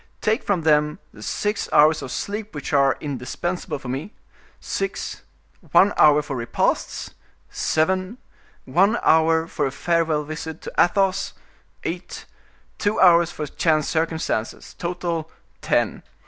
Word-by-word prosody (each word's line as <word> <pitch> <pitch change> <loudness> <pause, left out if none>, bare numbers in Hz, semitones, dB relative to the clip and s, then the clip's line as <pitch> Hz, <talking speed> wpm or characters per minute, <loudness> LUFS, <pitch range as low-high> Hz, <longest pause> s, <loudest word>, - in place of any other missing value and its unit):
Take 220 +3 +1
from 190 -5 -1
them 150 -1 +3 0.2
the 105 - -13
six 205 - -2
hours 155 +1 +5
of 130 - -6
sleep 210 - -4
which 145 +1 -5
are 140 -1 +4
indispensable 150 +5 -4
for 135 - -10
me—six; 155 - -6 0.5
one 200 - +6
hour 150 0 +5
for 140 -2 -5
repasts—seven; 185 - -2 0.5
one 195 - +3
hour 160 0 +4
for 165 - -1
a - - -4
farewell 165 0 0
visit 155 +1 -6
to - - -7
Athos—eight; 195 +1 -2 0.5
two 205 +1 0
hours 170 -2 +6
for 155 - -5
chance 155 0 +1
circumstances—total, 165 +2 -2 0.3
ten. - - 0
160 Hz, 115 wpm, -23 LUFS, 150-185 Hz, 0.5 s, one